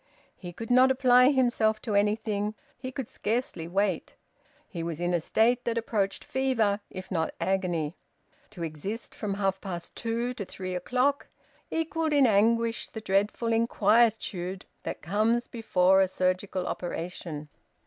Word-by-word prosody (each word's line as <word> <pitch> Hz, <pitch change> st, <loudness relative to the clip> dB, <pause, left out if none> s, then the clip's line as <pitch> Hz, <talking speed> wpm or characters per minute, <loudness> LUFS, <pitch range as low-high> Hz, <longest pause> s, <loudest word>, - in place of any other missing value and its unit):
He 175 Hz, -2 st, -8 dB
could 225 Hz, +6 st, -6 dB
not 255 Hz, +1 st, +6 dB
apply 255 Hz, -1 st, +5 dB
himself 240 Hz, -5 st, +2 dB
to 220 Hz, -, -2 dB
anything; 210 Hz, 0 st, +1 dB, 0.2 s
he 255 Hz, +1 st, -5 dB
could 255 Hz, -2 st, -5 dB
scarcely 210 Hz, -7 st, -2 dB
wait. 190 Hz, -1 st, -1 dB, 0.5 s
He 170 Hz, -, -6 dB
was 165 Hz, -1 st, -4 dB
in 175 Hz, 0 st, 0 dB
a 175 Hz, -, +3 dB
state 235 Hz, +8 st, +2 dB
that 235 Hz, -1 st, 0 dB
approached 205 Hz, -4 st, -1 dB
fever, 230 Hz, -6 st, +1 dB
if 185 Hz, +1 st, -9 dB
not 160 Hz, -3 st, -1 dB
agony. 175 Hz, -5 st, 0 dB, 0.6 s
To 185 Hz, -5 st, -7 dB
exist 165 Hz, +9 st, -5 dB
from 205 Hz, -3 st, -3 dB
half 195 Hz, -1 st, -1 dB
past 175 Hz, -3 st, -6 dB
two 235 Hz, +2 st, -2 dB
to 230 Hz, -, -5 dB
three 185 Hz, -1 st, -6 dB
o'clock 255 Hz, +10 st, 0 dB, 0.4 s
equalled 325 Hz, -1 st, -1 dB
in 285 Hz, -2 st, +5 dB
anguish 230 Hz, +2 st, +2 dB
the 220 Hz, -, -7 dB
dreadful 210 Hz, +3 st, +1 dB
inquietude 210 Hz, -5 st, +2 dB, 0.2 s
that -, -, -6 dB
comes 220 Hz, +7 st, +1 dB
before 190 Hz, -4 st, +3 dB
a 190 Hz, -, +4 dB
surgical 185 Hz, 0 st, -1 dB
operation. 170 Hz, -4 st, -5 dB
210 Hz, 145 wpm, -28 LUFS, 185-235 Hz, 0.6 s, not